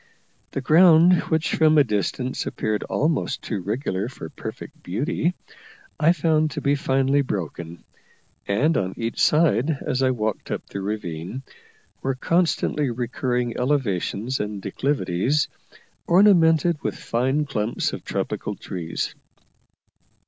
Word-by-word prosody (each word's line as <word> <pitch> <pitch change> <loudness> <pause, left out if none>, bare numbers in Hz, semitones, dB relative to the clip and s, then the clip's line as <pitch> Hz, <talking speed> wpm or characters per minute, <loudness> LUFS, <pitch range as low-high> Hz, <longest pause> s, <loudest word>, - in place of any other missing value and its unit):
The 135 - -4
ground, 165 +4 +6 0.2
which 160 0 +1
from 155 -1 +4
a 145 - +7
distance 120 +3 -2
appeared 110 -1 -2
almost 150 -3 -1
too 105 -4 -3
regular 105 0 -2
for 80 -10 -9
perfect - - -9
beauty, 145 - -1 0.6
I 160 +2 +5
found 155 -2 +2
to 135 - -5
be 140 - +2
finely 135 0 +2
broken; 85 - -5 0.6
and 135 +11 +2
on 95 0 -2
each 115 0 -3
side, 150 -2 +3
as 130 - 0
I 130 - +3
walked 110 -4 -2
up - - -3
the 100 - -6
ravine, 95 +2 -4 0.6
were 135 0 -1
constantly 160 -2 +1
recurring 120 0 -2
elevations 125 -2 -1
and 105 -1 -3
declivities, 125 +4 0 0.6
ornamented 170 -4 +4
with - - -3
fine 130 +6 0
clumps 110 -4 -2
of - - -6
tropical - - -3
trees. 85 -2 -4
130 Hz, 125 wpm, -23 LUFS, 105-155 Hz, 0.6 s, a